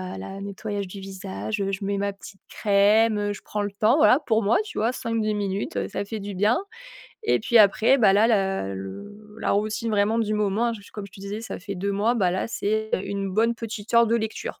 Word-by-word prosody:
heu, - - -7
là, 195 - -7
nettoyage 200 0 -4
du 195 +2 -9
visage, 195 +2 -5
heu, 195 0 -1
je 195 - -4
mets 200 0 -1
ma 200 0 -1
petite 195 0 -13
crème, 210 +2 +3
heu, 205 0 -1
je 205 - -10
prends 210 - -3
le 205 -1 -2
temps, 215 +6 +3
voilà, 295 -4 +6
pour 225 -1 +2
moi, 205 +3 +3
tu 425 - -10
vois? 230 +4 +1
5-10 230 -3 -1
minutes, 200 - -3
heu, 95 -1 -2
ça 200 - -3
fait 220 +2 -5
du 200 -1 -6
bien. 210 +6 +3 0.7
Et 435 - +2
puis 235 +2 +1
après, 220 +5 +5
bah, 215 -6 +5
là, 205 +3 +5
la 195 - 0
le 205 - -9
la - - +1
routine 215 +3 -1
vraiment 210 +2 +2
du 215 -2 0
moment, 210 +2 +1
hein, 235 - 0
j 205 - -11
je - - -17
comme 210 -2 -6
je 200 - -19
te - - -13
disais, 200 +2 -5
ça 230 - -6
fait 200 +2 -6
2 200 +2 -2
mois. 215 +4 +1
Bah 190 -7 +2
là, 185 - -1
c'est 220 0 -1
1 195 0 -3
bonne 230 +4 +2
petite 225 -1 -6
heure 235 0 +6
de 230 - +1
lecture. 220 -1 -4
205 Hz, 245 wpm, -24 LUFS, 195-220 Hz, 0.7 s, voilà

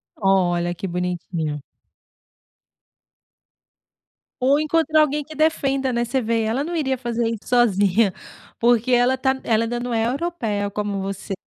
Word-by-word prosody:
Olha, 175 -3 +1
que 195 - -5
bonitinho. 170 -4 -3 2.8
Ou 280 +3 +4
encontrar 310 0 +2
alguém 300 0 +1
que 310 +1 -12
defenda, 275 -4 +1
né, 235 0 +1
você 265 +3 -1
vê, 230 -1 0
ela 225 +6 -1
não 345 +2 -4
iria 265 -5 0
fazer 235 -2 -2
isso 225 -2 -6
sozinha, 205 -4 +3 0.5
porque 240 +1 +3
ela 245 +2 +4
tá 265 0 0
ela 225 0 +1
não 245 -1 -3
é 225 0 +1
europeia 245 -9 -2
como 205 -1 -3
você. 195 0 -4
235 Hz, 135 wpm, -22 LUFS, 200-270 Hz, 2.8 s, Ou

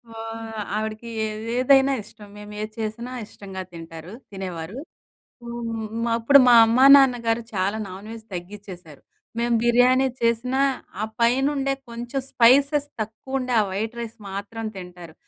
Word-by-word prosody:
ఓహ్! 225 0 -7 0.2
ఆవిడకి 215 +1 -4 0.5
ఏదైనా 270 +1 +5
ఇష్టం. 210 0 -15
మేము 210 0 -10
ఏది 215 0 -5
చేసినా 225 +3 -4
ఇష్టంగా 195 -2 -9
తింటారు 165 +1 -10 0.2
తినేవారు. 185 0 -6 0.7
హ్మ్, 235 -1 -5 0.2
మా 235 - 0
అప్పుడు 280 +5 +6
మా 245 - +7
అమ్మా, 240 +4 +4
నాన్నగారు 240 -4 +3
చాలా 195 +2 0
నాన్‍వెజ్ 215 +4 -9
తగ్గిచ్చేసారు. 180 -4 -9 0.4
మేము 235 0 +1
బిర్యానీ 250 +2 +4
చేసినా, 235 +3 +1 0.4
ఆ - - 0 0.2
పైనుండే 270 +3 +2 0.2
కొంచెం 240 +3 -4
స్పైసెస్ 280 +4 +4
తక్కువ 220 +5 -4
ఉండే, 255 -1 -3
ఆ - - +2
వైట్ 220 +5 -3
రైస్ 230 -1 -6
మాత్రం 205 +4 -6
తింటారు. 180 -3 -10
225 Hz, 130 wpm, -23 LUFS, 200-245 Hz, 0.7 s, మా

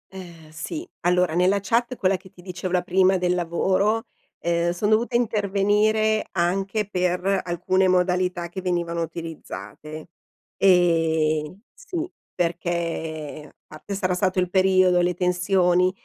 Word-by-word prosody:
Ehm 170 -4 -11
sì, 315 - -6 0.2
allora 180 -2 +2
nella 185 +3 +3
chat, 235 +5 0
quella 190 -3 +1
che 190 0 -17
ti 175 - -18
dicevo, 185 -1 -5
la 180 -1 +2
prima, 185 +1 +3
del 180 0 +1
lavoro, 190 +6 +1 0.4
ehm, 170 0 +1
son 175 +5 -1
dovuta 235 +3 +2
intervenire 215 0 +1
anche 195 +4 0
per 180 0 0
alcune 185 +2 +1
modalità 180 -1 +1
che 185 +2 -7
venivano 170 -2 -1
utilizzate. 160 -1 -8 0.5
Ehm, 165 -2 +2
sì, 370 -9 -5 0.3
perché 165 -3 -3
parte 200 - -8
sarà 185 -1 0
stato 185 0 0
il 180 -1 -1
periodo, 185 -2 +4
le 180 0 0
tensioni, 180 0 +2
180 Hz, 125 wpm, -23 LUFS, 175-195 Hz, 0.5 s, periodo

